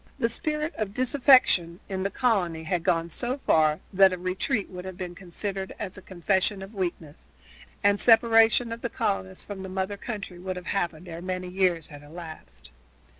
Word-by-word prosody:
The 230 Hz, -, +1 dB
spirit 300 Hz, +6 st, -2 dB
of 210 Hz, -1 st, -3 dB
disaffection 255 Hz, -, +4 dB
in 190 Hz, -1 st, -3 dB
the 195 Hz, -, 0 dB
colony 190 Hz, -9 st, 0 dB
had 175 Hz, +1 st, -1 dB
gone 165 Hz, 0 st, +1 dB
so 250 Hz, -, -2 dB
far 155 Hz, -1 st, +3 dB
that 190 Hz, 0 st, +6 dB
a 185 Hz, -, -2 dB
retreat 185 Hz, +6 st, -1 dB
would 180 Hz, -1 st, -7 dB
have 185 Hz, -1 st, -7 dB
been 180 Hz, -2 st, -5 dB
considered 190 Hz, +2 st, -5 dB
as 195 Hz, -2 st, -5 dB
a 190 Hz, -, -6 dB
confession 190 Hz, +2 st, 0 dB
of 195 Hz, +3 st, -11 dB
weakness, 170 Hz, -6 st, -5 dB, 0.6 s
and 205 Hz, 0 st, +4 dB
separation 225 Hz, 0 st, +5 dB
of 230 Hz, 0 st, -5 dB
the 240 Hz, -, -2 dB
colonists 95 Hz, -, -2 dB
from 200 Hz, -2 st, -7 dB
the 190 Hz, -, -6 dB
mother 190 Hz, +2 st, -2 dB
country 200 Hz, -5 st, -6 dB
would 185 Hz, +1 st, -4 dB
have 180 Hz, -1 st, -7 dB
happened 175 Hz, -3 st, -2 dB
ere 170 Hz, 0 st, -7 dB
many 185 Hz, 0 st, -4 dB
years 180 Hz, -3 st, +1 dB
had 145 Hz, -2 st, -11 dB
elapsed. 145 Hz, -, -11 dB
190 Hz, 180 wpm, -27 LUFS, 175-210 Hz, 0.6 s, that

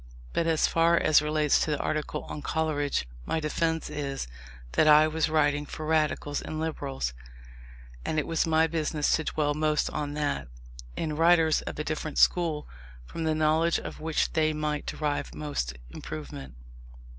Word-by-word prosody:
But 165 Hz, -, +1 dB
as 160 Hz, -2 st, +3 dB
far 170 Hz, +1 st, +3 dB
as 155 Hz, -2 st, +5 dB
relates 150 Hz, -1 st, +2 dB
to -, -, 0 dB
the 150 Hz, -, +1 dB
article 155 Hz, 0 st, -2 dB
on 150 Hz, -, -7 dB
Coleridge, 145 Hz, -, -1 dB, 0.2 s
my 160 Hz, -, -1 dB
defence 160 Hz, +1 st, -1 dB
is, 140 Hz, -, -4 dB, 0.4 s
that 155 Hz, -, +3 dB
I 155 Hz, +1 st, +7 dB
was 160 Hz, 0 st, 0 dB
writing 145 Hz, -2 st, +2 dB
for 155 Hz, -, -6 dB
Radicals 155 Hz, -2 st, 0 dB
and 155 Hz, -, -5 dB
Liberals, 140 Hz, -, -3 dB, 0.9 s
and 155 Hz, -, -2 dB
it 150 Hz, -, +1 dB
was 165 Hz, 0 st, 0 dB
my 160 Hz, 0 st, +4 dB
business 155 Hz, -2 st, 0 dB
to 160 Hz, -, -3 dB
dwell 145 Hz, -1 st, 0 dB
most 155 Hz, 0 st, +1 dB
on 145 Hz, -1 st, -3 dB
that, 145 Hz, -, -1 dB, 0.5 s
in 155 Hz, -2 st, -2 dB
writers 165 Hz, -1 st, +4 dB
of -, -, -6 dB
a 150 Hz, -, -2 dB
different 155 Hz, -1 st, -4 dB
school, 165 Hz, -4 st, +3 dB, 0.4 s
from 165 Hz, -, -5 dB
the 155 Hz, -1 st, +1 dB
knowledge 155 Hz, +2 st, +3 dB
of -, -, -7 dB
which 160 Hz, 0 st, 0 dB
they 155 Hz, -1 st, +2 dB
might 150 Hz, -1 st, -2 dB
derive 150 Hz, -2 st, -2 dB
most 140 Hz, -, -3 dB
improvement. 70 Hz, -4 st, -8 dB
155 Hz, 165 wpm, -28 LUFS, 145-160 Hz, 0.9 s, I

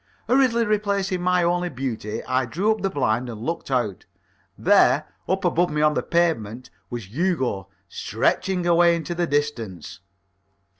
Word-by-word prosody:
Hurriedly 245 Hz, -3 st, +3 dB
replacing 200 Hz, -3 st, 0 dB
my 180 Hz, 0 st, +2 dB
only 175 Hz, +1 st, +1 dB
beauty, 115 Hz, -6 st, -4 dB
I 130 Hz, 0 st, 0 dB
drew 190 Hz, -, +1 dB
up 220 Hz, -, -1 dB
the 195 Hz, -, 0 dB
blind 125 Hz, -, 0 dB
and 110 Hz, -3 st, -7 dB
looked 165 Hz, +8 st, -4 dB
out. 120 Hz, -8 st, -1 dB, 0.5 s
There, -, -, +4 dB, 0.2 s
up 190 Hz, +1 st, 0 dB
above 175 Hz, 0 st, +2 dB
me 150 Hz, 0 st, 0 dB
on 150 Hz, 0 st, +4 dB
the -, -, 0 dB
pavement, 130 Hz, -9 st, -1 dB, 0.2 s
was 115 Hz, -6 st, -7 dB
Hugo, 130 Hz, -, -1 dB, 0.2 s
stretching 180 Hz, -, -1 dB
away 170 Hz, 0 st, +5 dB
into 165 Hz, +1 st, -4 dB
the 175 Hz, 0 st, -1 dB
distance. 115 Hz, -, -3 dB
165 Hz, 150 wpm, -23 LUFS, 120-180 Hz, 0.5 s, away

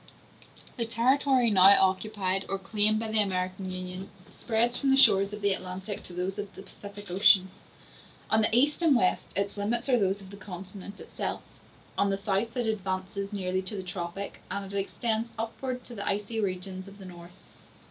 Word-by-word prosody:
The 235 Hz, -, 0 dB
territory 255 Hz, +1 st, +3 dB
now 195 Hz, 0 st, +8 dB
occupied 190 Hz, 0 st, 0 dB
or 195 Hz, -, -1 dB
claimed 210 Hz, +2 st, +2 dB
by 225 Hz, -1 st, -3 dB
the 220 Hz, -1 st, +3 dB
American 185 Hz, -1 st, -2 dB
Union 185 Hz, +1 st, -5 dB, 0.2 s
spreads 235 Hz, +1 st, 0 dB
from 275 Hz, -, +1 dB
the 270 Hz, -, +5 dB
shores 195 Hz, -6 st, +6 dB
of 210 Hz, 0 st, -7 dB
the 200 Hz, -1 st, +3 dB
Atlantic 190 Hz, +2 st, -5 dB
to 180 Hz, -, -10 dB
those 185 Hz, +3 st, -3 dB
of 205 Hz, -1 st, -6 dB
the 190 Hz, -, -9 dB
Pacific 200 Hz, -1 st, -11 dB
Ocean. 190 Hz, 0 st, +5 dB, 0.8 s
On 220 Hz, -, +5 dB
the 220 Hz, -, +3 dB
east 280 Hz, +8 st, +3 dB
and 320 Hz, -5 st, +5 dB
west 185 Hz, -7 st, +2 dB
its 200 Hz, +1 st, -1 dB
limits 225 Hz, +5 st, -1 dB
are 250 Hz, -2 st, +4 dB
those 195 Hz, 0 st, +1 dB
of 195 Hz, -1 st, -13 dB
the 200 Hz, -, -10 dB
continent 195 Hz, +1 st, -9 dB
itself. -, -, -4 dB, 0.6 s
On 200 Hz, -, +3 dB
the 195 Hz, -, 0 dB
south 200 Hz, +4 st, -1 dB
it 245 Hz, -, 0 dB
advances 195 Hz, -1 st, -3 dB
nearly 185 Hz, -2 st, -1 dB
to 190 Hz, +3 st, -5 dB
the 190 Hz, -, -4 dB
tropic, 180 Hz, +2 st, -6 dB
and 195 Hz, 0 st, -5 dB
it -, -, -4 dB
extends 220 Hz, +3 st, -1 dB
upwards 250 Hz, +3 st, -4 dB
to 245 Hz, -, -10 dB
the 200 Hz, -3 st, -5 dB
icy 210 Hz, +3 st, -1 dB
regions 185 Hz, -1 st, -3 dB
of 200 Hz, 0 st, -12 dB
the 195 Hz, -, -11 dB
North. 175 Hz, 0 st, -11 dB
200 Hz, 190 wpm, -28 LUFS, 190-220 Hz, 0.8 s, now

